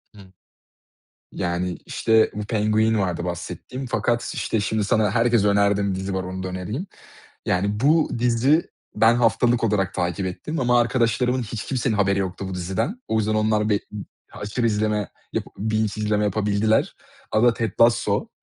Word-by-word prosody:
Hı. 100 - -13 1.1
Yani, 90 +1 -2
işte, 110 -1 +2
bu 105 0 -4
Penguin 110 0 +1
vardı 90 -3 -1
bahsettiğim 90 +9 -6
fakat, 120 0 -1
işte, 110 - -1
şimdi 105 +1 -1
sana 105 -1 +2
herkese 115 -2 +3
önerdiğim 100 -1 +2
dizi 95 +1 -4
var, 95 -1 -2
onu 95 0 -5
da 95 - -3
önereyim. 105 - -4 0.6
Yani, 100 +4 0
bu 155 +4 +3
dizi 125 +7 +2 0.3
ben 115 +2 +5
haftalık 120 0 +2
olarak 100 -4 0
takip 90 +1 -1
ettim 155 - -4
ama 120 -1 +3
arkadaşlarımın 125 +1 +1
hiç 110 0 -5
kimsenin 125 -4 -1
haberi 100 -1 +2
yoktu 95 0 -3
bu 95 - -5
diziden. 110 - -3
O 110 - +1
yüzden 110 0 0
onlar 110 0 +1
bi 105 -1 +2 0.5
aşırı 110 +4 -2
izleme, 105 -1 0 0.2
yap - - -2
binge 110 +1 0 0.2
izleme 105 0 +1
yapabildiler. 105 +1 +1 0.3
Adı 115 +1 +3
Ted 115 -4 -2
Lasso. 115 0 +3
105 Hz, 155 wpm, -23 LUFS, 100-115 Hz, 1.1 s, ben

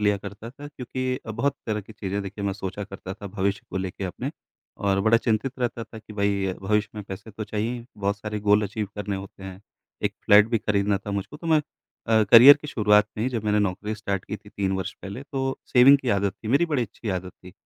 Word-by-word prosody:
लिया 105 -1 +3
करता 100 +4 -8
था। 140 +3 -10
क्योंकि 130 -2 -3
बहुत 140 +6 0
तरह 105 -1 -1
की 105 +2 -13
चीज़ें 100 -1 -3
देखिए 100 +1 -6
मैं 100 - 0
सोचा 95 +1 -5
करता 95 -1 -8
था 100 - -9
भविष्य 100 0 -1
को - - -4
लेके 95 0 -3
अपने 90 - -4 0.6
और 100 0 +3
बड़ा 110 +3 +5
चिंतित 115 +3 0
रहता 120 -2 -2
था 110 +1 -11
कि 110 0 -13
भाई 100 -2 0
भविष्य 105 +1 +1
में 105 - -5
पैसे 100 +3 -8
तो 110 +1 -6
चाहिए 105 +2 -2
ही। 120 -1 -6
बहुत 100 0 -1
सारे 105 +1 -4
गोल 105 +1 +4
अचीव 105 0 -3
करने 100 -1 -3
होते 95 0 -10
हैं। 95 0 -8 0.4
एक - - 0
फ्लैट 105 +2 +7
भी 115 - +1
खरीदना 100 -1 +1
था 100 - -7
मुझको 100 +9 -4
तो 165 - -9
मैं 160 -2 +4 0.5
अ, 110 -1 +5
करियर 130 +5 +11
की 150 - -8
शुरुआत 105 -3 +4
में 110 - -2
ही - - +2
जब 115 -3 -3
मैंने 105 0 +2
नौकरी 105 +2 -1
स्टार्ट 100 -3 -3
की 105 - -5
थी 105 - -17
3 100 -2 -2
वर्ष 95 -2 -3
पहले। 100 +8 -6
तो 135 -1 -3
सेविंग 130 +3 +7
की 130 - -4
आदत 100 -1 0
थी, 110 - -9
मेरी 140 +7 +3
बड़ी 150 -6 0
अच्छी 115 0 -7
आदत 90 0 -3
थी 90 - -11
105 Hz, 240 wpm, -25 LUFS, 100-115 Hz, 0.6 s, करियर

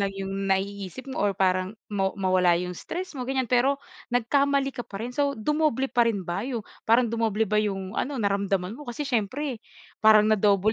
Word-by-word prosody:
lang 200 - +1
yung 195 0 -3
naiisip 195 +3 -2
mo - - -3
or 200 -2 +1
parang 185 +2 +1 0.2
ma 195 -1 +1
mawala 185 -3 +3
yung 180 +1 -3
stress 365 +1 -5
mo 255 -3 -5
gan'yan. 265 -1 0
Pero, 255 +3 +3 0.3
nagkamali 275 +3 +2
ka 255 - -6
pa 195 - -8
rin, 245 +2 -4
so, 280 0 0
dumoble 285 +1 0
pa 240 -1 +4
rin 205 -4 -1
ba 175 +3 -2
yu 240 -5 -3 0.3
parang 235 +2 +5
dumoble 225 -2 +1
ba 210 0 +1
yung 195 -2 -3
ano, 280 +1 -2
naramdaman 200 -2 0
mo 295 +3 -11
kasi 240 +5 -3
siyempre, 255 +1 -2 0.4
parang 215 -1 +7
na-double 205 0 +3
215 Hz, 190 wpm, -26 LUFS, 195-260 Hz, 0.4 s, parang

